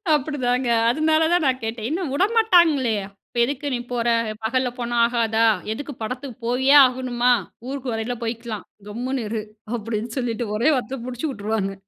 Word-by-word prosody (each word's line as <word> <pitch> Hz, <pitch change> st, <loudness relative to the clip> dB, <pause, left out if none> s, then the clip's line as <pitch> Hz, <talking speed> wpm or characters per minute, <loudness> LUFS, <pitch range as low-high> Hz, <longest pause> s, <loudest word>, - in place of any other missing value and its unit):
அப்படிதாங்க, 260 Hz, -3 st, -1 dB, 0.2 s
அதுனால 310 Hz, +5 st, +2 dB
தான் 350 Hz, -2 st, +3 dB
நான் 260 Hz, -1 st, +1 dB
கேட்டேன், 225 Hz, 0 st, -3 dB
ஏன்னா 340 Hz, +5 st, -1 dB
உடமாட்டாங்களே, 345 Hz, -, +4 dB, 0.3 s
"இப்ப -, -, -11 dB
எதுக்கு 280 Hz, +2 st, -4 dB
நீ -, -, -2 dB
போற? 240 Hz, -1 st, -1 dB, 0.4 s
பகல்ல 255 Hz, +3 st, +1 dB
போனா 240 Hz, 0 st, -2 dB
ஆகாதா? 230 Hz, -1 st, +1 dB, 0.3 s
எதுக்கு 290 Hz, +4 st, -6 dB
படத்துக்கு 250 Hz, +2 st, -5 dB
போயே 260 Hz, +3 st, +3 dB
ஆகணுமா? 250 Hz, -1 st, +1 dB, 0.3 s
ஊருக்கு 265 Hz, -2 st, -4 dB
வரையில 225 Hz, +2 st, -2 dB
போய்க்கலாம், 230 Hz, -3 st, -4 dB, 0.2 s
கம்முனு 245 Hz, +3 st, -3 dB
இரு," 220 Hz, -1 st, -2 dB, 0.3 s
அப்படின்னு 225 Hz, 0 st, -4 dB
சொல்லிட்டு 240 Hz, -2 st, -2 dB
ஒரே 240 Hz, +8 st, +3 dB
வார்த்த 255 Hz, -1 st, -4 dB
முடிச்சு 255 Hz, +5 st, -3 dB
உட்டுருவாங்க. 205 Hz, -3 st, -2 dB
245 Hz, 145 wpm, -23 LUFS, 230-270 Hz, 0.4 s, உடமாட்டாங்களே